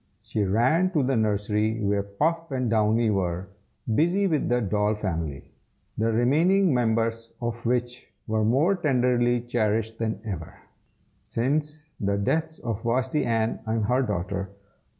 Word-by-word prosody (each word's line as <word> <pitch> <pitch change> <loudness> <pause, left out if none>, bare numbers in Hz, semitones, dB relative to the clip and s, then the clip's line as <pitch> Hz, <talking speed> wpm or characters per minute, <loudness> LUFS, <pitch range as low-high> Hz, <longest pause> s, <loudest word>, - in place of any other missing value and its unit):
She 105 - -1
ran 125 - +3
up 185 - -7
to 150 -5 +2
the 130 +1 +1
nursery, 105 0 0
where 100 -1 +1
Puff 160 +12 -1
and 130 -3 -1
Downy 110 +1 +3
were, 90 -1 -2 0.4
busy 175 - +2
with 160 -6 0
the 120 0 +2
doll 105 0 +1
family, 80 -9 -4 0.4
the 115 +1 +1
remaining 160 - +3
members 115 -1 0
of 120 -1 -4
which 125 0 -2
were 110 0 0
more 135 - +3
tenderly 125 -7 +2
cherished 115 -2 -1
than 110 -3 -2
ever, 85 -7 -6 0.6
since 150 +5 -2 0.2
the 100 0 0
deaths 160 +10 -1
of 115 -3 -4
Vashti 130 +5 0
Ann 115 -1 0
and 110 -1 0
her 125 +4 +2
daughter. 100 -3 -2
115 Hz, 145 wpm, -26 LUFS, 105-130 Hz, 0.6 s, ran